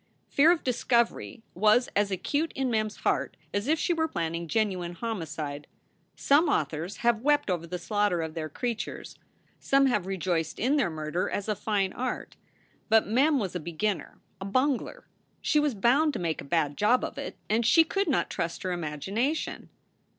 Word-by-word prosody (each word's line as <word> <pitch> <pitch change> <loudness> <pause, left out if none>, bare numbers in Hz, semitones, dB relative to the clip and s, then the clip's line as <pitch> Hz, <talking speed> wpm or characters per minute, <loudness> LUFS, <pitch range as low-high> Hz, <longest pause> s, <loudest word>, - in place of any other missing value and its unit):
Fear 305 +4 +5
of 345 - 0
discovery 235 -1 0
was 215 +6 +4
as 205 0 +2
acute 285 - -1
in 265 -2 -1
Mem 215 -1 +1
s 215 - -10
heart - - -1 0.2
as 205 +4 -1
if 315 +2 +3
she 345 - +1
were 320 -1 0
planning 170 - -3
genuine 185 -3 -1
homicide. 155 -8 -5 0.5
Some 295 +3 +3
authors 160 - -1
have 235 -2 +3
wept 290 -5 +2
over 170 -2 -2
the 180 +2 -4
slaughter 205 -2 0
of 160 -1 -5
their 155 -1 -4
creatures; 230 - -4 0.4
some 275 0 +3
have 210 -8 +1
rejoiced 175 -4 -1
in 270 +6 +2
their 255 -11 +2
murder 155 +2 -2
as 200 - -3
a 215 - 0
fine 200 -2 -1
art. 255 0 -4 0.5
But 225 0 +5
Mem 275 +8 +3
was 200 -8 -2
a 180 - -2
beginner, 175 +5 -3 0.2
a - - -4
bungler. 265 - 0 0.3
She 300 - +2
was 295 -5 +1
bound 275 +9 +3
to - - -3
make 165 -3 -2
a - - -10
bad 145 -1 0
job 225 +5 +3
of - - -4
it, - - -6
and 225 +3 +2
she 280 +8 +6
could 390 +5 -1
not 295 - +1
trust 170 -2 -3
her 185 - -1
imagination. 190 - -2
210 Hz, 180 wpm, -28 LUFS, 175-260 Hz, 0.5 s, she